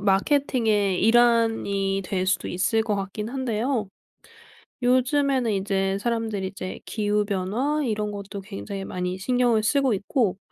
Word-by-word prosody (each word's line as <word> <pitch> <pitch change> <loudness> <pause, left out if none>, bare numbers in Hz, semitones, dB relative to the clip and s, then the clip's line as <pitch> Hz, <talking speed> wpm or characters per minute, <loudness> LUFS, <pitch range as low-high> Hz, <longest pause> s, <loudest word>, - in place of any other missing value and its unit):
마케팅의 210 -2 +2
일환이 225 -4 +3
될 185 -1 -1
수도 180 -2 0
있을 190 +5 +1
것 210 -2 -1
같긴 200 +2 -4
한데요. 245 -3 -1 0.9
요즘에는 255 -1 +2
이제 195 0 0
사람들이 225 -3 -2
이제 185 -1 -6
기후 210 -1 0
변화 215 +10 -1
이런 210 -4 -1
것도 200 -1 -7
굉장히 195 0 -6
많이 180 -1 -3
신경을 240 +1 +2
쓰고 270 +1 +2
있고 200 -1 0
210 Hz, 285 characters per minute, -25 LUFS, 195-240 Hz, 0.9 s, 일환이